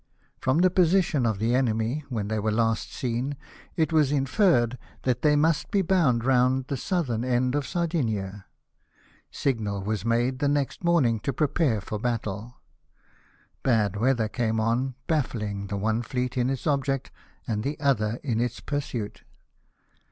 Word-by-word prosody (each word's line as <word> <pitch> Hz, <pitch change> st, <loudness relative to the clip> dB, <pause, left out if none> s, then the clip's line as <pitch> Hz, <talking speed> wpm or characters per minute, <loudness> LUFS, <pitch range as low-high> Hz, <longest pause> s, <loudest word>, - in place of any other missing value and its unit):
From 130 Hz, +3 st, +1 dB
the 180 Hz, +1 st, +4 dB
position 170 Hz, -7 st, +3 dB
of 110 Hz, -3 st, 0 dB
the 115 Hz, +4 st, 0 dB
enemy 120 Hz, +2 st, 0 dB
when 110 Hz, -6 st, -2 dB
they 110 Hz, 0 st, -1 dB
were 110 Hz, +1 st, 0 dB
last 115 Hz, 0 st, 0 dB
seen, 130 Hz, +3 st, -2 dB, 0.4 s
it 160 Hz, 0 st, +1 dB
was 150 Hz, -3 st, +4 dB
inferred 135 Hz, -, +2 dB, 0.2 s
that 125 Hz, -1 st, 0 dB
they 150 Hz, -1 st, +4 dB
must 155 Hz, +1 st, +2 dB
be 200 Hz, -1 st, +2 dB
bound 145 Hz, -11 st, +2 dB
round 130 Hz, 0 st, +3 dB
the 140 Hz, -, -3 dB
southern 130 Hz, -, -1 dB
end 125 Hz, 0 st, +1 dB
of 145 Hz, -1 st, -1 dB
Sardinia. 110 Hz, -, -2 dB, 0.8 s
Signal 105 Hz, -7 st, -2 dB
was 105 Hz, 0 st, -2 dB
made 120 Hz, +3 st, +1 dB
the 145 Hz, -, +1 dB
next 145 Hz, +3 st, -1 dB
morning 145 Hz, -10 st, +3 dB
to 140 Hz, -, -2 dB
prepare 135 Hz, -4 st, +1 dB
for 105 Hz, +2 st, -5 dB
battle. 115 Hz, 0 st, -3 dB, 1.1 s
Bad 110 Hz, -6 st, +2 dB
weather 115 Hz, +1 st, +2 dB
came 110 Hz, 0 st, -1 dB
on, 120 Hz, +4 st, 0 dB
baffling 105 Hz, -10 st, -2 dB
the 100 Hz, +1 st, -3 dB
one 110 Hz, +3 st, 0 dB
fleet 125 Hz, +1 st, -3 dB
in 125 Hz, 0 st, +1 dB
its 135 Hz, -1 st, -3 dB
object 140 Hz, -3 st, 0 dB, 0.4 s
and 105 Hz, -3 st, -1 dB
the 145 Hz, +3 st, -3 dB
other 120 Hz, -6 st, +1 dB
in 120 Hz, -5 st, 0 dB
its 120 Hz, 0 st, -2 dB
pursuit. 130 Hz, -7 st, -4 dB
125 Hz, 155 wpm, -26 LUFS, 110-145 Hz, 1.1 s, the